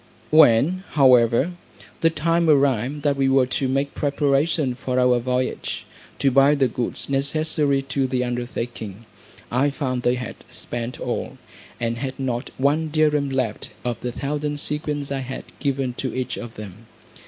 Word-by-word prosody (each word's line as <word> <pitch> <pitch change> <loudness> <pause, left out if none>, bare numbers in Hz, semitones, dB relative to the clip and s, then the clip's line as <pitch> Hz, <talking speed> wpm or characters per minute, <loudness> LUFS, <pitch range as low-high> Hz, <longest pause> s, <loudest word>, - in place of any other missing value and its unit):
When, 155 +4 +5
however, 130 +1 +5 0.5
the 165 - +4
time 165 +1 +1
arrived 140 -1 +2
that 145 -2 +2
we 135 -1 +2
were 135 -1 +4
to 130 +1 -1
make 140 +2 0
preparations 145 -1 +1
for 130 -1 -1
our 125 -1 +4
voyage, 125 +1 -2 0.3
to 135 - +2
buy 135 +3 +5
the 135 -2 +3
goods 120 +1 -4
necessary 140 0 +1
to 135 0 -1
the 125 -1 0
undertaking, 120 -3 -5 0.5
I 130 +4 +2
found 130 -3 -2
they 120 0 +2
had 125 0 -6
spent 120 +1 -4
all, - - -3 0.4
and 115 0 -1
had 135 +1 -4
not 125 -1 -2
one 150 +4 +1
dirrim 150 -2 +2
left 125 -5 -2 0.2
of 120 -1 -2
the 125 - -3
thousand 145 +3 -3
sequins 150 -1 -2
I 135 - -1
had 130 0 -5 0.2
given 135 -3 -1
to - - -2
each 130 -1 -2
of 120 -2 -8
them. 105 +1 -10
135 Hz, 155 wpm, -23 LUFS, 125-145 Hz, 0.5 s, When